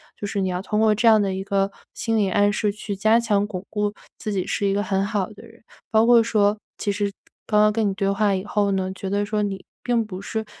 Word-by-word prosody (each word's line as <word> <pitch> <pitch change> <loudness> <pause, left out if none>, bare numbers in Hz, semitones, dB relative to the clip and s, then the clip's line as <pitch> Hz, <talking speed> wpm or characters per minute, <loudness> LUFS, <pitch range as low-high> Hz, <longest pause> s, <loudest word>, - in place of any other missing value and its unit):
“就 205 - -5
是 200 - -2
你 190 - 0
要 180 0 -2
通 210 +2 -1
过 220 -1 +4
这 230 +3 +1
样 220 -1 +7
的 195 -2 0
一 190 +1 -3
个 195 0 0 0.2
心 225 -1 -1
理 200 -2 +2
暗 205 +2 +3
示 210 -1 0
去 205 0 -5
加 215 +4 +4
强 205 -3 +1
巩 190 -2 -6
固 210 -1 0 0.3
自 215 - -4
己 190 -3 -1
是 200 - -1
一 195 - +1
个 205 - 0
很 195 -1 0
好 205 -2 -1
的 205 - -14
人。 230 +1 -19 0.3
包 220 0 +4
括 240 -1 +7
说 210 -2 +2 0.2
其 205 - -1
实 200 0 -1 0.4
刚 210 - +3
刚 210 0 +4
跟 215 -2 +1
你 - - -2
对 195 0 0
话 200 0 +2
以 185 - -3
后 205 -1 +1
呢， 190 -1 -1
觉 190 0 -6
得 205 +1 0
说 210 0 -1
你 200 -2 -3 0.2
并 235 -2 +1
不 190 -3 -7
是， 220 +2 -4
205 Hz, 285 characters per minute, -23 LUFS, 195-215 Hz, 0.4 s, 样